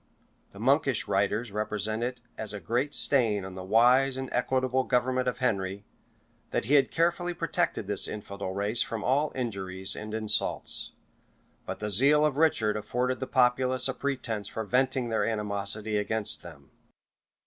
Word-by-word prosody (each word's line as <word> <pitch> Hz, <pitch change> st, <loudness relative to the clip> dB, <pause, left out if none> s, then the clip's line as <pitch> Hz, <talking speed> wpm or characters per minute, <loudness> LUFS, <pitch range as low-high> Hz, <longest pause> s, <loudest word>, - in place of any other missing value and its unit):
The -, -, -15 dB
monkish 135 Hz, 0 st, +2 dB
writers 100 Hz, +3 st, 0 dB
represent 105 Hz, +1 st, -2 dB
it 125 Hz, +1 st, -3 dB
as 110 Hz, -1 st, -4 dB
a 105 Hz, -, -5 dB
great 120 Hz, -, -1 dB
stain 110 Hz, -8 st, +2 dB
on 95 Hz, -, -8 dB
the 95 Hz, 0 st, -7 dB
wise 125 Hz, +6 st, +4 dB
and 130 Hz, -1 st, -4 dB
equitable 130 Hz, +1 st, +1 dB
government 130 Hz, 0 st, +1 dB
of 125 Hz, -, -1 dB
Henry, 100 Hz, -5 st, -1 dB, 0.6 s
that -, -, -1 dB
he 135 Hz, -, 0 dB
had 140 Hz, -2 st, +5 dB
carefully 175 Hz, +1 st, 0 dB
protected -, -, -1 dB
this -, -, +2 dB
infidel 100 Hz, -2 st, -6 dB
race 105 Hz, +5 st, 0 dB
from 115 Hz, -2 st, -2 dB
all 145 Hz, +4 st, +1 dB
injuries 95 Hz, -6 st, -3 dB
and 110 Hz, +1 st, -6 dB
insults; 110 Hz, -1 st, 0 dB, 0.7 s
but -, -, -4 dB
the 105 Hz, -, -4 dB
zeal 140 Hz, +8 st, +4 dB
of 145 Hz, -3 st, 0 dB
Richard 110 Hz, -9 st, +2 dB
afforded 125 Hz, +4 st, -1 dB
the 130 Hz, -, -4 dB
populace 130 Hz, 0 st, +2 dB
a 130 Hz, -, -1 dB
pretence 120 Hz, -8 st, -3 dB
for 110 Hz, -, -4 dB
venting 125 Hz, +2 st, +1 dB
their 110 Hz, -2 st, +1 dB
animosity 105 Hz, 0 st, -2 dB
against 105 Hz, +1 st, -1 dB
them. 75 Hz, -5 st, -13 dB
115 Hz, 160 wpm, -28 LUFS, 105-130 Hz, 0.7 s, had